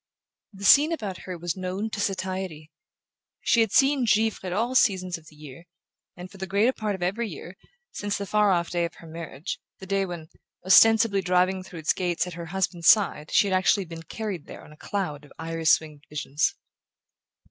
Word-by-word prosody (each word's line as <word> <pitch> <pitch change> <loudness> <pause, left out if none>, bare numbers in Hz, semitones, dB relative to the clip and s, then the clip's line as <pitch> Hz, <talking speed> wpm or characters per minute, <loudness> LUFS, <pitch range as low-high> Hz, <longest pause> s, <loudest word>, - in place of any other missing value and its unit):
The 200 -1 -8
scene 295 +9 +7
about 205 - -5
her 180 -1 -5
was 170 -1 -3
known 190 +4 -4
to 215 - -4
satiety. 185 -5 -3 0.7
She 235 - +3
had 225 -3 +1
seen 270 +1 +4
Givre 220 0 +2
at 185 - -3
all 230 +7 -1
seasons 185 -7 +2
of 160 - -21
the 155 - -16
year, 150 +2 -12 0.5
and 180 +1 -9
for - - -13
the 190 - -4
greater 210 +7 +2
part 215 -4 -3
of 185 - -6
every 210 +5 -1
year, 175 +2 -9 0.4
since 205 0 -3
the 200 - -4
far 210 +1 +2
off 170 -2 +1
day 175 -1 0
of 170 - -7
her - - -14
marriage; 165 0 -7 0.2
the 190 - -10
day 195 0 0
when, 170 -3 -8 0.4
ostensibly 225 +1 +6
driving 185 +1 +1
through 180 -3 -10
its 155 - +2
gates 175 -1 -1
at 180 - -7
her 170 0 -7
husband's 175 -1 -2
side, 180 -8 +4
she - - +4
had 190 - -1
actually 190 +1 +2
been 165 -1 -9
carried 200 -2 -6
there - - -10
on - - -15
a - - -14
cloud 150 -5 -4
of 145 - -17
iris 165 0 +2
winged 150 -2 -13
visions. 145 0 -1
185 Hz, 200 wpm, -25 LUFS, 165-205 Hz, 0.7 s, scene